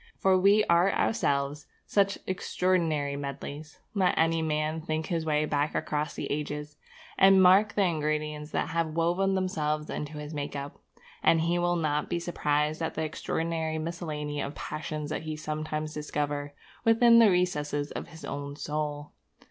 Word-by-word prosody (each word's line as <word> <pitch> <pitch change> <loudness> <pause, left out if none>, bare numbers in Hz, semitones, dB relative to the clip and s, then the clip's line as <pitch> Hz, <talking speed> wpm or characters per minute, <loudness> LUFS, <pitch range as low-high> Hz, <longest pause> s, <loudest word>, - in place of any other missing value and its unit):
For 190 -1 +3
we 200 +3 +5
are 170 +3 +4
ourselves 140 -6 0 0.2
such 200 -1 +2
extraordinary 170 -6 0
medlies. 140 +2 -6 0.2
Let 190 -4 +2
any 165 0 +3
man 155 0 -1
think 155 0 -2
his 165 -2 -2
way 150 0 +2
back 145 0 -1
across 150 0 -2
the - - -4
ages, 150 0 -4 0.4
and 195 0 +7
mark 190 +3 +6
the 205 - +3
ingredients 150 -3 -1
that - - -1
have 165 -1 -1
woven 175 +4 +2
themselves 155 -5 -1
into 150 +1 -4
his 150 +1 -7
make 145 -1 -4
up, 140 0 -6 0.4
and 165 - +4
he 170 +2 +1
will 175 0 +1
not 150 -3 0
be 170 - 0
surprised 150 -2 0
at 160 - -2
the 160 - -1
extraordinary 160 0 -2
miscellany 155 -3 -4
of 140 +2 -4
passions 155 0 -5
that - - -2
he 155 -1 -4
sometimes 155 0 -4
discovers 145 -1 -2 0.3
within 230 +1 +6
the 225 -2 +7
recesses 150 -5 0
of - - -5
his 160 -1 -11
own 140 0 -5
soul. 150 0 -4
155 Hz, 160 wpm, -28 LUFS, 150-175 Hz, 0.4 s, and